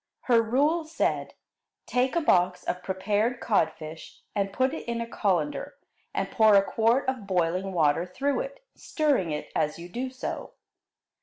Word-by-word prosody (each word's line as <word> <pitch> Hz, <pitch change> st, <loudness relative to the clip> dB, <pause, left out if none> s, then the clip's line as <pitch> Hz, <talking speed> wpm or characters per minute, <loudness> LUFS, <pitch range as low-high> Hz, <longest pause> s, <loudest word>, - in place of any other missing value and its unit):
Her 235 Hz, -3 st, +4 dB
rule 285 Hz, +9 st, +2 dB
said: 315 Hz, +1 st, -1 dB, 0.5 s
Take 255 Hz, +4 st, +1 dB
a 340 Hz, -, +3 dB
box 180 Hz, -, +2 dB
of 180 Hz, -, -3 dB
prepared 205 Hz, +6 st, 0 dB
codfish 160 Hz, -6 st, -2 dB
and 200 Hz, -1 st, 0 dB
put 260 Hz, +6 st, +1 dB
it 320 Hz, -, -6 dB
in 235 Hz, 0 st, -2 dB
a 235 Hz, -, -2 dB
colander 180 Hz, -9 st, -1 dB, 0.4 s
and -, -, -2 dB
pour 220 Hz, -2 st, +5 dB
a 195 Hz, -, +6 dB
quart 230 Hz, +6 st, +2 dB
of 255 Hz, -6 st, -2 dB
boiling 185 Hz, +1 st, 0 dB
water 165 Hz, 0 st, +2 dB
through 275 Hz, +10 st, -1 dB
it, -, -, -6 dB
stirring 285 Hz, -, 0 dB
it 150 Hz, -1 st, -4 dB
as 150 Hz, -, 0 dB
you 170 Hz, +1 st, -8 dB
do 250 Hz, +7 st, -3 dB
so. 255 Hz, 0 st, -6 dB
215 Hz, 160 wpm, -27 LUFS, 180-260 Hz, 0.5 s, a